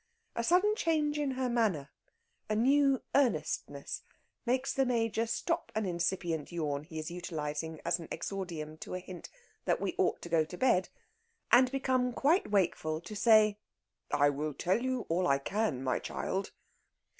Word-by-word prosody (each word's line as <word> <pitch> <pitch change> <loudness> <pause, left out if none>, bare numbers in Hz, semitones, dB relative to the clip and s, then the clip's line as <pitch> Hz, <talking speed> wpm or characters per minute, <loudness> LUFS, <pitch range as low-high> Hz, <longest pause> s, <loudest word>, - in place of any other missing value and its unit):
A 235 - -1
sudden 370 - +4
change 305 -5 +1
in 290 -2 0
her 260 0 -1
manner, 210 - 0 0.6
a 215 - +1
new 275 +3 +3
earnestness, 275 -4 0 0.5
makes 255 +2 +1
the 270 - +2
Major 230 -2 0
stop 335 +9 -1
an 220 -1 0
incipient 170 -3 -1
yawn 150 -4 -2
he 160 -1 -9
is 155 +2 -4
utilising 160 -2 -4
as - - +1
an 165 - -8
exordium 165 -6 -4
to - - -6
a - - -2
hint 180 -1 -9 0.4
that - - +2
we - - -2
ought - - +2
to - - -5
go 165 -1 +4
to 170 +3 -9
bed, 215 -7 +3 0.6
and 250 +1 +6
become 260 -2 +1
quite 310 +10 +2
wakeful 165 -6 +1
to 210 +5 -8
say: 215 -1 +5 0.5
"I 145 0 +4
will 150 +1 -3
tell 190 +6 +1
you 255 -1 -1
all 175 +2 +1
I 140 - +4
can, 155 - -1
my 130 - 0
child." 195 +1 -3
200 Hz, 165 wpm, -32 LUFS, 160-255 Hz, 0.6 s, and